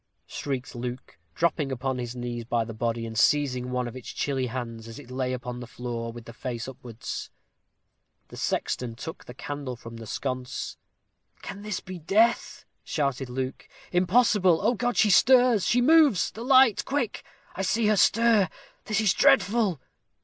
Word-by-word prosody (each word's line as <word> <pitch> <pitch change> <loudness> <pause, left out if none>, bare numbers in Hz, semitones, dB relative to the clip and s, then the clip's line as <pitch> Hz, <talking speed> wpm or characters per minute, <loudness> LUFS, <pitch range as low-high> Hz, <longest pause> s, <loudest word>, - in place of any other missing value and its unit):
shrieked 135 -3 -4
Luke, 125 -3 -7 0.2
dropping 160 -4 0
upon 130 0 -2
his 120 0 -5
knees 120 -1 -4
by 115 0 0
the 115 - -7
body, 115 +1 -2
and 110 0 -7
seizing 125 0 +2
one 125 -1 -1
of 120 - -8
its 130 - -9
chilly 135 -3 -1
hands, 115 -2 -6
as 115 - -9
it 125 - -12
lay 130 0 -1
upon 125 -1 -5
the 120 - -8
floor, 120 -2 -5
with 115 0 -11
the 115 - -10
face 120 -2 -5
upwards. 125 -3 -7 1.0
The - - -11
sexton 120 -2 -2
took 160 +7 -8
the 125 - -10
candle 145 -2 -5
from 115 0 -10
the 115 -1 -9
sconce. 130 +2 -4 0.7
"Can 200 - -7
this 210 -2 -4
be 185 -1 -8
death?" 210 +9 +1 0.2
shouted 140 -3 -2
Luke. 130 +1 -5 0.2
"Impossible! 185 -1 +3
Oh, 230 +4 +3
God! 245 +1 -1
she 210 - +5
stirs 245 0 +5
she 245 - +3
moves. 295 - +5
The 225 - -8
light! 260 -4 +5
quick. 265 -6 -2 0.3
I - - -3
see 220 +4 +1
her 215 0 +4
stir! 220 -2 +4 0.4
This 215 0 0
is 210 -4 +3
dreadful!" 200 - +3
135 Hz, 170 wpm, -26 LUFS, 120-205 Hz, 1.0 s, she